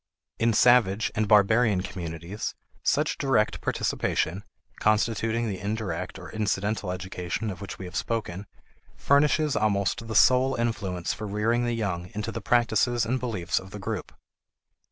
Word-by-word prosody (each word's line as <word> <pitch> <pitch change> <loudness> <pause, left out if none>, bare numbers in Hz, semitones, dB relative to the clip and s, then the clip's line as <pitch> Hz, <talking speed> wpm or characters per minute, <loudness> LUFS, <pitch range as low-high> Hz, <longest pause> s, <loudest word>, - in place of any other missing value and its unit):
In 115 0 +3
savage 110 -3 +4
and 110 -1 0
barbarian 105 0 +4
communities, 85 +1 -5 0.3
such - - +1
direct 125 -6 +1
participation 95 +5 -1 0.4
(constituting 115 +2 +1
the 95 -3 -3
indirect 105 +1 -3
or - - -10
incidental 105 -2 -1
education 90 +3 -4
of 90 - -9
which 100 - -7
we 95 - -7
have 90 -1 -9
spoken) 105 -2 -3 0.5
furnishes 150 +1 +3
almost 105 +2 0
the 110 - -4
sole 130 +3 +5
influence 100 -7 -2
for 110 - -6
rearing 115 +4 +1
the 120 - 0
young 90 -5 -3
into 105 +2 -3
the - - -5
practices 120 0 +2
and 130 +3 0
beliefs 110 -9 -1
of 95 - -12
the 105 - -8
group. 95 - -4
105 Hz, 145 wpm, -26 LUFS, 95-115 Hz, 0.5 s, sole